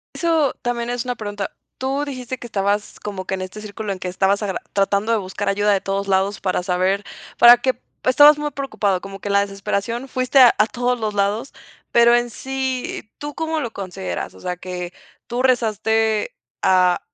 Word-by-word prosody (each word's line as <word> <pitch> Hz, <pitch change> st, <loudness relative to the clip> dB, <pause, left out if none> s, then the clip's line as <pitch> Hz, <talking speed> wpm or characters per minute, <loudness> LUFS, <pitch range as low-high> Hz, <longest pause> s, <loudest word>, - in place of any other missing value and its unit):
Eso 325 Hz, -5 st, +2 dB
también 240 Hz, -1 st, -2 dB
es 245 Hz, 0 st, -2 dB
una 245 Hz, -, -2 dB
pregunta. 205 Hz, -3 st, -5 dB, 0.3 s
Tú 270 Hz, +2 st, -1 dB
dijiste 260 Hz, -2 st, -5 dB
que 240 Hz, -, -8 dB
estabas 205 Hz, -1 st, -1 dB
como 195 Hz, -3 st, -6 dB
que 190 Hz, -, -2 dB
en 185 Hz, -, -6 dB
este 185 Hz, +3 st, -7 dB
círculo 210 Hz, 0 st, -5 dB
en 185 Hz, -, -9 dB
que 185 Hz, -, -5 dB
estabas 195 Hz, +3 st, +1 dB
agra 195 Hz, -3 st, -3 dB
tratando 200 Hz, +2 st, +1 dB
de 225 Hz, -, +3 dB
buscar 190 Hz, +1 st, -5 dB
ayuda 205 Hz, +1 st, +2 dB
de 195 Hz, -1 st, +2 dB
todos 195 Hz, 0 st, -2 dB
lados 195 Hz, +1 st, +1 dB
para 185 Hz, -2 st, 0 dB
saber, 185 Hz, +2 st, +1 dB, 0.3 s
para 240 Hz, +1 st, +9 dB
que 255 Hz, +1 st, -1 dB, 0.2 s
estabas 290 Hz, +3 st, +7 dB
muy 295 Hz, 0 st, -1 dB
preocupado, 215 Hz, -10 st, -1 dB
como 195 Hz, 0 st, -9 dB
que 205 Hz, -, -5 dB
en -, -, 0 dB
la 200 Hz, -, +5 dB
desesperación, 200 Hz, +5 st, -3 dB
fuiste 255 Hz, +1 st, +2 dB
a 250 Hz, -2 st, +8 dB, 0.2 s
todos 245 Hz, 0 st, 0 dB
los 215 Hz, -1 st, -2 dB
lados, 205 Hz, +5 st, -1 dB, 0.4 s
pero 235 Hz, 0 st, +6 dB
en 240 Hz, 0 st, +1 dB
sí, 265 Hz, -3 st, -4 dB
¿tú 295 Hz, -1 st, -7 dB
cómo 320 Hz, 0 st, -1 dB
lo 235 Hz, -6 st, -3 dB
consideras?, 175 Hz, -, -5 dB
o 95 Hz, -, -15 dB
sea, 180 Hz, -, -3 dB
que, 180 Hz, 0 st, -6 dB, 0.3 s
¿tú 245 Hz, +2 st, -2 dB
rezaste 225 Hz, -, +1 dB, 0.3 s
a 180 Hz, -1 st, +4 dB
215 Hz, 195 wpm, -21 LUFS, 195-250 Hz, 0.4 s, para